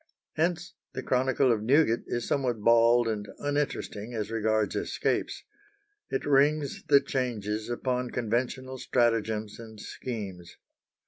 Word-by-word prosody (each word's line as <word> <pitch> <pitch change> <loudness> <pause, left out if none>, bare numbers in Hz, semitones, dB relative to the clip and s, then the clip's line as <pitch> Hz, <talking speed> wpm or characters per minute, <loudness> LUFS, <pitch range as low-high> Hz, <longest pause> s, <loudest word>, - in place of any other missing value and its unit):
Hence 170 +2 -1 0.2
the - - -4
chronicle 130 0 +2
of 110 -3 +1
Newgate 120 0 +3
is 120 -1 -2
somewhat 125 -5 0
bald 115 +1 +5
and 105 -2 -2
uninteresting 140 -6 -2
as 110 0 -3
regards 110 -1 +1
escapes. - - -1 0.7
It - - -2
rings 145 0 +2
the 140 -1 +6
changes 110 -5 -2
upon 125 +1 -1
conventional 125 +3 -2
stratagems 110 -4 0
and 110 -2 -10
schemes. 100 -8 -7
120 Hz, 120 wpm, -28 LUFS, 110-130 Hz, 0.7 s, the